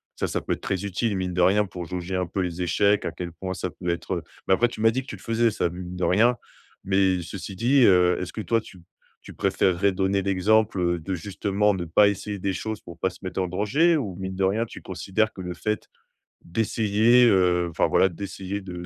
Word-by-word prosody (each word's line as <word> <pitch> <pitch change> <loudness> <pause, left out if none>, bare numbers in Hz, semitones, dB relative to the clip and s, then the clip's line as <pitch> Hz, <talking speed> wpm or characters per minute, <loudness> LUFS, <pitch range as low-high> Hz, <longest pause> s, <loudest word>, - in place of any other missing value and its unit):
ça, - - -2
ça - - -2
peut - - -2
être - - -7
très 100 0 -2
utile, 100 +1 -1
mine 90 -1 -2
de 90 - 0
rien, 105 +3 +4
pour 90 -3 -7
jauger 90 +2 -4
un 90 0 0
peu 95 +2 -2
les 90 0 -3
échecs, 100 +4 +2
à - - -2
quel 85 0 -6
point 95 +3 -5
ça 90 - -3
peut 90 +1 -5
être, 85 +2 -2
heu 85 - -6 0.2
mais 95 - +4
après 120 +5 +3
tu 115 - -10
m'as 110 0 +5
dit 130 - -1
que 130 - -17
tu - - -6
le - - -15
faisais 115 0 +1
ça, 90 - -1
mine 90 +1 -7
de 90 - -4
rien. 120 +6 +3 0.5
Mais 95 -1 +2
ceci 95 +2 -7
dit, 130 +6 +3
heu, 90 -1 +5
est-ce 90 - -5
que - - -7
toi, 115 +1 +1
tu 95 - -14
p - - -19 0.4
tu - - -12
préfèrerais 95 +2 +1
donner 95 +1 0
l'exemple, 100 +2 +2
heu, 85 -1 +1
de, 95 +4 -3
justement, 100 +3 0
ne 90 - -3
pas 100 +6 +5
essayer 100 0 -3
des 95 0 -1
choses 110 +2 -4
pour 85 -2 -12
pas 95 - 0
se 95 - -14
mettre 95 0 -3
en 90 - -1
danger? 140 - +2
Ou 100 -10 -4
mine 95 0 -5
de 95 - -1
rien, 105 +5 +1
tu - - -11
considères 95 +4 -1
que 95 - -8
le 90 -1 -5
fait 105 +3 -3 0.6
d'essayer, 110 +4 +3
heu, 90 -5 +3
enfin, - - +1
voilà - - +4
d'essayer 95 +2 -6
de 90 -2 -7
95 Hz, 245 wpm, -25 LUFS, 90-105 Hz, 0.6 s, m'as